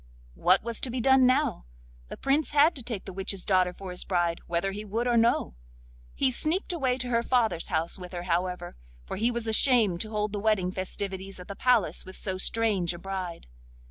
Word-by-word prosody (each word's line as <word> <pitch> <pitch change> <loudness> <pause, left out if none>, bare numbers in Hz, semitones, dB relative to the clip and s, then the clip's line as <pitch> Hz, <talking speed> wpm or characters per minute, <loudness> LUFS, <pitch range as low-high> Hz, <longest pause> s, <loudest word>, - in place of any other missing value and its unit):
What 185 - +3
was 230 -1 -1
to 260 - -1
be 250 +1 -3
done 265 +1 +5
now? 255 - +1 0.4
The - - -8
Prince 285 +2 0
had 295 +3 +5
to 270 - -7
take 225 -4 -5
the 190 - -7
witch's 195 0 -3
daughter 185 -2 +3
for 185 +1 -9
his 180 - -2
bride 175 -2 0
whether 175 +3 -1
he 205 +2 -6
would 225 +4 -2
or 240 - +2
no; 230 - +2 0.6
he 260 - +2
sneaked 340 - 0
away 260 -7 0
to 250 -1 -3
her 235 -1 +2
father's 230 -8 +1
house 165 0 -1
with 180 -1 -9
her, 175 -1 -5
however, 180 0 -2 0.3
for - - -5
he 225 +4 +2
was 235 -1 -2
ashamed 220 -5 +3
to 215 - -3
hold 210 -1 -2
the 205 - -2
wedding 200 -4 +1
festivities 190 0 -4
at 180 - -10
the 200 - -7
palace 245 -5 +2
with 185 - -11
so 190 -2 -3
strange 195 -5 +2
a - - -8
bride. 185 -1 -6
205 Hz, 210 wpm, -27 LUFS, 185-240 Hz, 0.6 s, done